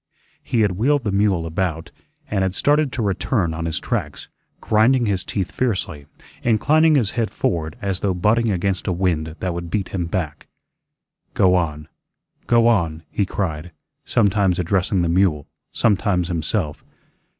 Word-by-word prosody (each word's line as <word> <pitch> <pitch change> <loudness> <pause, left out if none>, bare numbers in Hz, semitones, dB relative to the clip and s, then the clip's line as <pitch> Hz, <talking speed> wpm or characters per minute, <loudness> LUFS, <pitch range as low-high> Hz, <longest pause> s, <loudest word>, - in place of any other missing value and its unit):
He 115 - 0
had 105 -3 +3
wheeled 130 +9 +1
the 105 - -1
mule 100 -4 +1
about, 80 -1 -3 0.4
and 100 -2 -1
had 95 0 -1
started 145 -1 +2
to 120 - -2
return 95 -2 0
on 80 +1 -4
his 80 - -2
tracks, - - -4 0.3
grinding 120 +3 +3
his 100 -3 0
teeth 95 -3 -3
fiercely, 95 - -2 0.3
inclining 155 +8 +3
his 120 -8 +2
head 115 -2 -1
forward 80 0 -2
as 95 -2 -1
though 95 -3 0
butting 110 +5 +2
against 95 0 -1
a - - +1
wind 85 -3 -1
that 90 -2 -1
would 85 0 -5
beat 100 +1 -2
him 90 -3 -3
back. 80 -4 -4 0.9
"Go 90 -1 +4
on, 75 -4 -1 0.6
go 115 -1 +4
on," 85 -8 +1
he 100 - 0
cried, 85 -4 -3 0.3
sometimes 100 -4 +2
addressing 90 +1 +1
the - - +1
mule, 85 -4 +2 0.3
sometimes 100 -4 +1
himself. 80 -1 -2
95 Hz, 155 wpm, -21 LUFS, 85-110 Hz, 0.9 s, Go